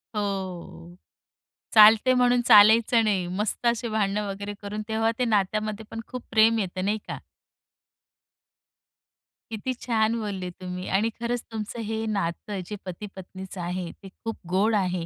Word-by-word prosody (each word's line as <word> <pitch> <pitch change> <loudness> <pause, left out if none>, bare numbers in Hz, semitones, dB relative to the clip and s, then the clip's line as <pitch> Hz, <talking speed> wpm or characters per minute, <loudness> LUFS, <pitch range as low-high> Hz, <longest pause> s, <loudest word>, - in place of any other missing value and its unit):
हो. 190 -4 -5 0.8
चालते 220 +4 +7
म्हणून 245 -1 +3
चालायचं 225 +2 +6
नाही. 190 -4 0
मस्त 210 +3 -2
अशी 235 0 +1
भांडण 210 -2 0
वगैरे 200 +1 -5
करून 210 +1 -5
तेव्हा 225 +1 +1
ते 250 - +2
नात्यामध्ये 215 0 0
पण 225 - -5
खूप 250 -1 -7
प्रेम 225 +1 +4
येत. 185 -2 -4
नाही 210 +2 0
का? - - -5 2.3
किती 225 +4 -3
छान 225 -1 +2
बोलले 195 -4 -4
तुम्ही 180 0 -7
आणि 210 +4 +2
खरंच 240 0 -2
तुमचं 220 +1 -5
हे 220 +1 -3
नातं 200 0 -3
जे 210 - -4
पती 185 +3 -6
पत्नीचं 190 0 -8
आहे, 175 0 -4
ते 195 - -14
खूप 225 +4 -7
गोड 205 +4 +2
आहे 180 -4 0
210 Hz, 145 wpm, -25 LUFS, 190-225 Hz, 2.3 s, चालते